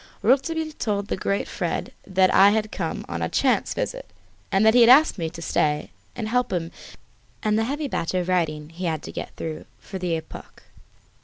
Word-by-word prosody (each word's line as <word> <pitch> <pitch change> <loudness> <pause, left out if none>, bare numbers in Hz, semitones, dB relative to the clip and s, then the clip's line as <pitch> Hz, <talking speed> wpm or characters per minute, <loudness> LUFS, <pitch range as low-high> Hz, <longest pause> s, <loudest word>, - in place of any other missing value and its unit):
Rouletabille 310 +6 +2
told 205 -2 -1
the - - 0
great 200 +1 -1
Fred - - -3
that 190 0 +3
I 195 +1 +7
had 215 0 0
come - - -4
on - - -4
a - - -1
chance - - +1
visit, - - -3 0.4
and 195 +3 +3
that 220 - +6
he 245 - +6
had 230 - +7
asked 280 - +6
me 165 -1 -1
to 165 0 -9
stay 150 -1 0 0.2
and 225 -3 -4
help 250 +2 0
him 170 -2 -2 0.7
in 215 0 +2
the 220 +1 +1
heavy 290 +4 -2
batch 175 -8 -2
of 180 -1 0
writing 155 -4 0
he 175 +3 -6
had 160 -3 -2
to - - -7
get - - -7
through 160 -1 -6
for 190 - -8
the 175 -2 -1
"Epoque." 160 - -9
195 Hz, 205 wpm, -24 LUFS, 170-240 Hz, 0.7 s, I